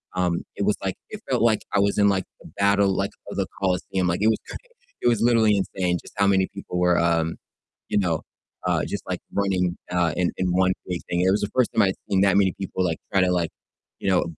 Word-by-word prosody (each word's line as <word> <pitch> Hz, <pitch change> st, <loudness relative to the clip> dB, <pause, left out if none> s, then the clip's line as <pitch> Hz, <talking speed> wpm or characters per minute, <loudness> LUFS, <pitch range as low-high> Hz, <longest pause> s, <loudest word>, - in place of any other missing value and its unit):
um, 90 Hz, -2 st, 0 dB
it -, -, -2 dB
was 105 Hz, -, +2 dB
like 95 Hz, -1 st, -1 dB
it 215 Hz, -, -7 dB
felt 125 Hz, -2 st, +1 dB
like 110 Hz, -2 st, +3 dB
I 100 Hz, -, +3 dB
was 100 Hz, 0 st, +2 dB
in, 100 Hz, -1 st, +5 dB
like, 95 Hz, -2 st, 0 dB, 0.2 s
the -, -, -12 dB
battle, 100 Hz, -1 st, +3 dB
like -, -, 0 dB, 0.2 s
of -, -, -7 dB
the -, -, 0 dB
Colosseum. 95 Hz, -1 st, 0 dB
Like 90 Hz, +3 st, 0 dB
it 110 Hz, -, +4 dB
was 110 Hz, -, +2 dB
cra -, -, -8 dB, 0.5 s
it -, -, +1 dB
was 115 Hz, -2 st, +1 dB
literally 115 Hz, -3 st, +4 dB
insane 90 Hz, -2 st, -1 dB
just -, -, -15 dB
how 100 Hz, -, +3 dB
many 95 Hz, -1 st, +3 dB
people 95 Hz, -2 st, -5 dB
were, 90 Hz, -1 st, +3 dB
um, 85 Hz, -1 st, +1 dB, 0.5 s
you -, -, +1 dB
know, 85 Hz, -6 st, +1 dB, 0.4 s
uh, -, -, +1 dB
just -, -, -4 dB
like -, -, -2 dB
running, 95 Hz, -3 st, +1 dB, 0.2 s
uh, 85 Hz, -3 st, +1 dB
in 90 Hz, -1 st, +1 dB
in 95 Hz, -, 0 dB
one 95 Hz, 0 st, +3 dB, 0.2 s
big 90 Hz, -2 st, -3 dB
thing. 85 Hz, -, 0 dB
It 95 Hz, -, +3 dB
was 100 Hz, -, +1 dB
the 105 Hz, -, -1 dB
first 125 Hz, -3 st, +3 dB
time -, -, +4 dB
I'd 95 Hz, -1 st, +1 dB
seen 95 Hz, -1 st, +2 dB
that 100 Hz, -1 st, +4 dB
many 95 Hz, -3 st, +3 dB
people, 95 Hz, -1 st, -2 dB
like, 80 Hz, -2 st, -1 dB
try 95 Hz, -, +3 dB
to 90 Hz, -, +3 dB
like, 85 Hz, -3 st, 0 dB, 0.5 s
you -, -, -1 dB
know, 95 Hz, -1 st, +3 dB
95 Hz, 245 wpm, -24 LUFS, 90-100 Hz, 0.5 s, in